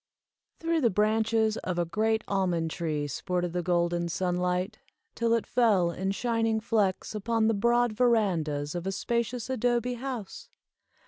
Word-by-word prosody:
Through 330 Hz, -1 st, 0 dB
the 235 Hz, -, +4 dB
branches 220 Hz, +2 st, +2 dB
of 180 Hz, -1 st, -3 dB
a 175 Hz, -, +1 dB
great 220 Hz, +5 st, 0 dB
almond 180 Hz, -5 st, 0 dB
tree 155 Hz, -4 st, -2 dB
sported 175 Hz, +4 st, -2 dB
the 180 Hz, -, 0 dB
golden 175 Hz, 0 st, 0 dB
sunlight, 180 Hz, +3 st, -1 dB, 0.3 s
till 230 Hz, 0 st, +1 dB
it 230 Hz, -, -1 dB
fell 205 Hz, -8 st, +3 dB
in 190 Hz, +3 st, -3 dB
shining 225 Hz, +1 st, 0 dB
flecks 210 Hz, -4 st, 0 dB
upon 220 Hz, +1 st, 0 dB
the 225 Hz, -, +3 dB
broad 235 Hz, +2 st, +2 dB
verandas 180 Hz, -12 st, +1 dB
of 175 Hz, +1 st, -4 dB
a -, -, 0 dB
spacious 235 Hz, +3 st, -2 dB
adobe 245 Hz, -1 st, 0 dB
house. 245 Hz, -5 st, -6 dB
210 Hz, 145 wpm, -28 LUFS, 180-230 Hz, 0.3 s, the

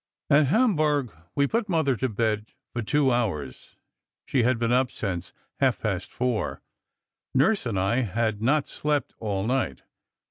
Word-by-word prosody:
"At 145 Hz, 0 st, +6 dB
Hamburg, 155 Hz, -, +2 dB, 0.2 s
we 140 Hz, -, +3 dB
put 220 Hz, +6 st, -1 dB
Mother 160 Hz, -7 st, +2 dB
to 130 Hz, -, 0 dB
bed 110 Hz, -1 st, -1 dB, 0.3 s
for 120 Hz, -, -2 dB
two 135 Hz, +4 st, +2 dB
hours. 85 Hz, -, -2 dB, 0.5 s
She 130 Hz, -, +1 dB
had 120 Hz, +1 st, +2 dB
been 115 Hz, 0 st, 0 dB
up 125 Hz, +1 st, +3 dB
since 95 Hz, -7 st, -4 dB, 0.3 s
half -, -, +2 dB
past -, -, -2 dB
four. 125 Hz, -3 st, -2 dB, 0.7 s
Nurse 145 Hz, -, +3 dB
and 100 Hz, -5 st, -1 dB
I 95 Hz, +6 st, +1 dB
had 110 Hz, -2 st, 0 dB
not 140 Hz, +6 st, +2 dB
slept 150 Hz, -2 st, -1 dB
all 100 Hz, -3 st, -2 dB
night. 130 Hz, +3 st, -1 dB
125 Hz, 150 wpm, -26 LUFS, 110-145 Hz, 0.7 s, At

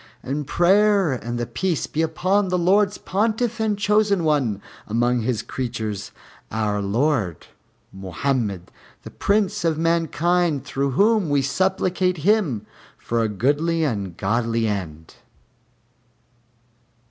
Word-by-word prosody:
And 140 Hz, +2 st, -3 dB
prayer 195 Hz, 0 st, +3 dB
and 120 Hz, -2 st, -4 dB
the 120 Hz, -, -2 dB
Peace 150 Hz, +8 st, -1 dB
be 155 Hz, -, -2 dB
upon 185 Hz, +5 st, +1 dB
the 180 Hz, 0 st, 0 dB
Lord's 195 Hz, +3 st, +2 dB
Pontiff 225 Hz, +3 st, -1 dB
and 215 Hz, -2 st, 0 dB
Chosen 205 Hz, -2 st, +2 dB
One 140 Hz, -10 st, +1 dB, 0.3 s
among 120 Hz, +2 st, +1 dB
His 115 Hz, 0 st, -1 dB
creatures, 110 Hz, -5 st, -4 dB, 0.4 s
our 105 Hz, -1 st, -1 dB
Lord 105 Hz, -, 0 dB, 0.5 s
MOHAMMED 95 Hz, 0 st, -2 dB, 0.3 s
the -, -, -9 dB
Prince 200 Hz, -4 st, 0 dB
of 165 Hz, -2 st, +1 dB
mankind, 165 Hz, -2 st, +1 dB
through 140 Hz, -1 st, -2 dB
whom 210 Hz, -, +3 dB
we 140 Hz, -1 st, +2 dB
supplicate 185 Hz, +3 st, 0 dB
Him 185 Hz, -, +2 dB, 0.3 s
for 115 Hz, 0 st, -1 dB
a 110 Hz, -, 0 dB
goodly 145 Hz, -, +1 dB
and 105 Hz, -10 st, -1 dB
a -, -, -9 dB
godly 115 Hz, +5 st, -1 dB
end. 80 Hz, -6 st, -5 dB
145 Hz, 125 wpm, -22 LUFS, 115-185 Hz, 0.5 s, prayer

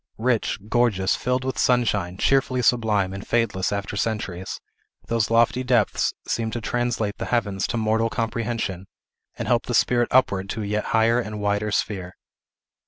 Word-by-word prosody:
Rich, 115 Hz, -5 st, 0 dB
gorgeous, 110 Hz, -5 st, +2 dB
filled 125 Hz, +1 st, -1 dB
with 130 Hz, 0 st, -3 dB
sunshine, 105 Hz, -8 st, +1 dB
cheerfully 130 Hz, +1 st, +2 dB
sublime, 105 Hz, -6 st, +2 dB
and 100 Hz, -, -6 dB
fadeless 115 Hz, -6 st, 0 dB
after 100 Hz, 0 st, -3 dB
centuries, 100 Hz, -4 st, -3 dB, 0.5 s
those 115 Hz, -2 st, 0 dB
lofty 115 Hz, +2 st, +3 dB
depths 125 Hz, -4 st, +2 dB, 0.2 s
seemed 115 Hz, -1 st, -1 dB
to 120 Hz, -, -2 dB
translate 120 Hz, -2 st, -2 dB
the -, -, -3 dB
heavens 100 Hz, -6 st, 0 dB
to 120 Hz, -, -2 dB
mortal 110 Hz, +1 st, +1 dB
comprehension, 115 Hz, -5 st, -3 dB, 0.5 s
and -, -, -4 dB
help 120 Hz, -1 st, +1 dB
the 120 Hz, -, 0 dB
spirit 120 Hz, 0 st, +3 dB
upward 100 Hz, -7 st, +2 dB
to 110 Hz, -, -3 dB
a -, -, -4 dB
yet 105 Hz, +1 st, -1 dB
higher 115 Hz, +1 st, +3 dB
and 105 Hz, -3 st, -4 dB
wider 105 Hz, +1 st, 0 dB
sphere. 95 Hz, -3 st, -2 dB
110 Hz, 160 wpm, -24 LUFS, 100-120 Hz, 0.5 s, lofty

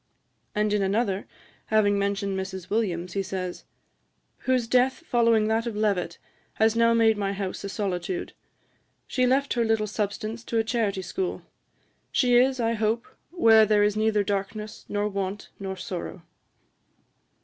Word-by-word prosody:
And 210 Hz, 0 st, +1 dB
in 210 Hz, -, +2 dB
another, 195 Hz, 0 st, 0 dB, 0.4 s
having 205 Hz, -2 st, +3 dB
mentioned 200 Hz, 0 st, -1 dB
Mrs. 190 Hz, -1 st, -5 dB
Williams, 180 Hz, -5 st, -1 dB
he 195 Hz, -, 0 dB
says, 185 Hz, -2 st, -5 dB, 0.7 s
'whose 255 Hz, -3 st, +1 dB
death 255 Hz, +5 st, +2 dB
following 230 Hz, -4 st, +3 dB
that 225 Hz, +2 st, 0 dB
of 230 Hz, -, -3 dB
Levett, 200 Hz, -5 st, 0 dB, 0.4 s
has 220 Hz, 0 st, +3 dB
now 230 Hz, 0 st, +4 dB
made 225 Hz, -2 st, +4 dB
my 200 Hz, -1 st, -1 dB
house 195 Hz, -1 st, -4 dB
a 200 Hz, -, -4 dB
solitude. 185 Hz, -3 st, -3 dB, 0.7 s
She 255 Hz, -1 st, +1 dB
left 275 Hz, +2 st, +2 dB
her 235 Hz, -, +1 dB
little 220 Hz, -1 st, +1 dB
substance 215 Hz, +2 st, -3 dB
to 230 Hz, -, -2 dB
a 225 Hz, -, +3 dB
charity 220 Hz, -4 st, -1 dB
school. 365 Hz, -, -3 dB, 0.7 s
She 250 Hz, -2 st, +2 dB
is, 260 Hz, +1 st, +4 dB
I 230 Hz, -1 st, +1 dB
hope, 225 Hz, +1 st, 0 dB, 0.2 s
where 225 Hz, -11 st, +6 dB
there 210 Hz, -1 st, +4 dB
is 210 Hz, 0 st, +2 dB
neither 215 Hz, -1 st, +2 dB
darkness, 205 Hz, +2 st, -4 dB
nor 205 Hz, 0 st, 0 dB
want, 200 Hz, 0 st, -4 dB
nor 190 Hz, -1 st, -4 dB
sorrow.' 180 Hz, -3 st, -6 dB
215 Hz, 150 wpm, -26 LUFS, 195-230 Hz, 0.7 s, where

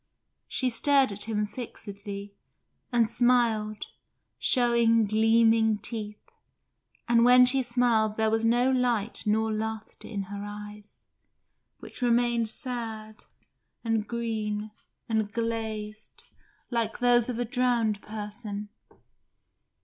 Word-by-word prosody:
She 255 Hz, -2 st, 0 dB
stared 275 Hz, +1 st, +3 dB
at 200 Hz, +1 st, -1 dB
him 210 Hz, -1 st, 0 dB
fixedly, 205 Hz, -3 st, -8 dB, 0.6 s
and 235 Hz, -2 st, +3 dB
smiled, 230 Hz, -3 st, +1 dB, 0.5 s
showing 235 Hz, -3 st, +3 dB
gleaming 225 Hz, +1 st, +3 dB
teeth, 210 Hz, -1 st, -7 dB, 0.8 s
and 235 Hz, -1 st, +4 dB
when 250 Hz, +1 st, +7 dB
she 265 Hz, +2 st, +3 dB
smiled 235 Hz, -3 st, +1 dB
there 220 Hz, 0 st, +2 dB
was 225 Hz, 0 st, +1 dB
no 240 Hz, +3 st, +3 dB
light 240 Hz, -4 st, 0 dB
nor 220 Hz, +1 st, +1 dB
laughter 220 Hz, 0 st, -5 dB
in 200 Hz, -3 st, -4 dB
her 200 Hz, +1 st, -7 dB
eyes, 210 Hz, 0 st, -10 dB, 0.8 s
which -, -, -11 dB
remained 240 Hz, -1 st, +2 dB
sad 220 Hz, -3 st, -6 dB, 0.6 s
and 225 Hz, -2 st, -1 dB
green 215 Hz, -3 st, -3 dB, 0.4 s
and 220 Hz, -2 st, -1 dB
glazed 220 Hz, -2 st, -4 dB, 0.5 s
like 230 Hz, -2 st, -1 dB
those 245 Hz, -1 st, +3 dB
of 245 Hz, -, -3 dB
a 245 Hz, -, -1 dB
drowned 235 Hz, -4 st, 0 dB
person. 210 Hz, -1 st, -6 dB
225 Hz, 110 wpm, -27 LUFS, 210-240 Hz, 0.8 s, when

